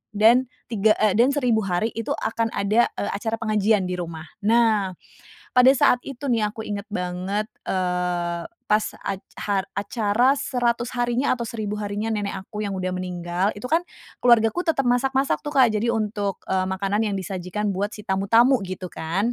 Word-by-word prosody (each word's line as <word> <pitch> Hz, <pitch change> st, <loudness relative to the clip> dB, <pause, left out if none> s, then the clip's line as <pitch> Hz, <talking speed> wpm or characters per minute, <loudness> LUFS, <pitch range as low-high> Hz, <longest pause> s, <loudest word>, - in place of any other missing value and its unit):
dan 235 Hz, +5 st, +5 dB, 0.2 s
3, 215 Hz, -1 st, +3 dB
eee, 215 Hz, -1 st, +3 dB
dan 230 Hz, +6 st, +4 dB
1000 245 Hz, -6 st, +2 dB
hari 195 Hz, +2 st, -1 dB
itu 230 Hz, 0 st, -6 dB
akan 225 Hz, +1 st, -1 dB
ada, 210 Hz, +4 st, +3 dB
eee, -, -, -2 dB
acara 220 Hz, +2 st, -2 dB
pengajian 215 Hz, -2 st, +1 dB
di 180 Hz, 0 st, -3 dB
rumah. 165 Hz, -2 st, -5 dB, 0.2 s
Nah, 220 Hz, -5 st, +3 dB, 0.6 s
pada 250 Hz, +1 st, +8 dB
saat 255 Hz, -2 st, +4 dB
itu 275 Hz, +1 st, -6 dB
nih 230 Hz, -4 st, +2 dB
aku 220 Hz, -, -8 dB
inget 205 Hz, -2 st, -4 dB
banget, 185 Hz, +3 st, -2 dB, 0.2 s
eee, 180 Hz, -2 st, -1 dB, 0.2 s
pas 210 Hz, 0 st, +3 dB, 0.2 s
ac 195 Hz, -1 st, -4 dB, 0.2 s
ha 200 Hz, -2 st, 0 dB
acara 215 Hz, +6 st, +1 dB
100 245 Hz, -4 st, -1 dB
harinya 245 Hz, +2 st, +1 dB
atau 235 Hz, -2 st, -3 dB
1000 210 Hz, -2 st, -4 dB
harinya 205 Hz, +2 st, -2 dB
nenek 205 Hz, -2 st, -2 dB
aku 210 Hz, +1 st, -7 dB
yang 200 Hz, -2 st, -2 dB
udah 185 Hz, 0 st, -2 dB
meninggal 180 Hz, 0 st, -2 dB
itu 205 Hz, -, -10 dB
kan 325 Hz, -, +4 dB, 0.4 s
keluargaku 235 Hz, +5 st, +4 dB
tetep 325 Hz, -6 st, 0 dB
masak-masak 265 Hz, +2 st, +1 dB
tuh 295 Hz, 0 st, -6 dB
Kak, 250 Hz, -4 st, +6 dB
jadi 215 Hz, +2 st, 0 dB
untuk, 210 Hz, -4 st, -1 dB
eee, 185 Hz, 0 st, 0 dB
makanan 195 Hz, +2 st, -1 dB
yang 200 Hz, -, -2 dB
disajikan 190 Hz, +2 st, -3 dB
buat 200 Hz, +2 st, -3 dB
si 210 Hz, -, -11 dB
tamu-tamu 225 Hz, +7 st, +3 dB
gitu 185 Hz, -2 st, -6 dB
kan. 190 Hz, +9 st, -1 dB
210 Hz, 170 wpm, -23 LUFS, 190-235 Hz, 0.6 s, pada